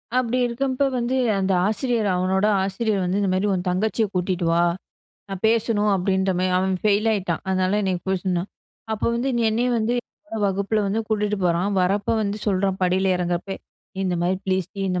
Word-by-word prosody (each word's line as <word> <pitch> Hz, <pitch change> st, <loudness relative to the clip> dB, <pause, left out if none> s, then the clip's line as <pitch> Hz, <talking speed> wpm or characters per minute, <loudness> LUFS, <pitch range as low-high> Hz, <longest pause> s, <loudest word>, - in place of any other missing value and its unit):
அப்டி 255 Hz, 0 st, +1 dB
இருக்கம்ப்போ 260 Hz, +3 st, 0 dB
வந்து 245 Hz, +2 st, -1 dB, 0.2 s
அந்த 195 Hz, 0 st, 0 dB, 0.2 s
ஆசிரியர் 225 Hz, -1 st, 0 dB
அவனோட 190 Hz, +2 st, +1 dB, 0.2 s
ஆசிரியர் 200 Hz, +1 st, -1 dB
வந்து 180 Hz, +2 st, 0 dB
இந்த 195 Hz, -, +1 dB
மாரி 190 Hz, +3 st, +1 dB
உன் 180 Hz, 0 st, -2 dB
தங்கச்சிய 215 Hz, +4 st, +1 dB
கூட்டிட்டு 180 Hz, -1 st, -1 dB
வா. 170 Hz, +1 st, +3 dB, 0.7 s
நான் 195 Hz, -1 st, -5 dB
பேசணும் 220 Hz, -2 st, +2 dB
அப்டின்ற 190 Hz, +1 st, +1 dB
மாரி 185 Hz, 0 st, +1 dB
அவன் 190 Hz, 0 st, +1 dB
ஃபெயில் 210 Hz, +1 st, +2 dB
ஆயிட்டான் 185 Hz, -5 st, -1 dB
அதனால 185 Hz, +1 st, +1 dB
என்ன 190 Hz, -1 st, 0 dB, 0.2 s
போய் 190 Hz, -2 st, 0 dB
சொன்னான். 180 Hz, 0 st, -1 dB, 0.4 s
அப்போ 215 Hz, -, -1 dB
வந்து 245 Hz, +3 st, -1 dB, 0.2 s
என்னையும் 240 Hz, +2 st, +1 dB
வந்து 225 Hz, +3 st, 0 dB, 0.5 s
வகுப்புல 200 Hz, +2 st, 0 dB
வந்து 215 Hz, +3 st, 0 dB
கூட்டிட்டு 210 Hz, -1 st, 0 dB
போறான் 175 Hz, +3 st, +1 dB
வரப்போ 200 Hz, +4 st, +1 dB
வந்து 205 Hz, +1 st, -2 dB
சொல்றான். 195 Hz, -1 st, +1 dB
படியில 185 Hz, +1 st, +2 dB
இறங்கறப்பே 180 Hz, +2 st, -2 dB, 0.5 s
"இந்த 180 Hz, -2 st, 0 dB
மாரி 185 Hz, +2 st, +1 dB
ப்ளீஸ் 185 Hz, -2 st, 0 dB
டி 195 Hz, -, -6 dB
இந்த 180 Hz, 0 st, 0 dB
195 Hz, 170 wpm, -23 LUFS, 185-220 Hz, 0.7 s, வா